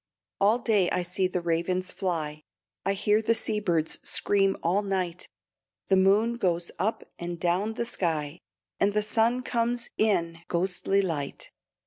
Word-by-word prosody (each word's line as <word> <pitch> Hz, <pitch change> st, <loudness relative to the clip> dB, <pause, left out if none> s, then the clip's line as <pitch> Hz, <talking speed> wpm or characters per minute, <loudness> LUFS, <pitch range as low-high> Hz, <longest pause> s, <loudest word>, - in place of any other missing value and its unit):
All 210 Hz, +4 st, +4 dB
day 215 Hz, -7 st, +2 dB
I 180 Hz, -, 0 dB
see 185 Hz, +2 st, 0 dB
the 180 Hz, -1 st, -2 dB
ravens 175 Hz, +2 st, 0 dB
fly, 155 Hz, -5 st, -3 dB, 0.5 s
I 195 Hz, -, +3 dB
hear 210 Hz, +2 st, +2 dB
the 230 Hz, +1 st, +2 dB
sea 215 Hz, -1 st, 0 dB
birds 170 Hz, -6 st, 0 dB
scream 195 Hz, -1 st, +1 dB
all 180 Hz, +5 st, +2 dB
night; 185 Hz, -3 st, -2 dB, 0.6 s
The 190 Hz, -, +5 dB
moon 205 Hz, +5 st, +3 dB
goes 175 Hz, -5 st, 0 dB
up 220 Hz, +3 st, -1 dB, 0.2 s
and 175 Hz, 0 st, -5 dB
down 185 Hz, +6 st, 0 dB
the 235 Hz, -, -2 dB
sky, 160 Hz, -8 st, -2 dB, 0.4 s
And 200 Hz, +1 st, +2 dB
the 210 Hz, 0 st, +1 dB
sun 230 Hz, +4 st, +2 dB
comes 240 Hz, 0 st, -1 dB
in 170 Hz, -6 st, +1 dB
ghostly 190 Hz, +2 st, +1 dB
light. 150 Hz, -6 st, -4 dB
190 Hz, 150 wpm, -27 LUFS, 175-210 Hz, 0.6 s, The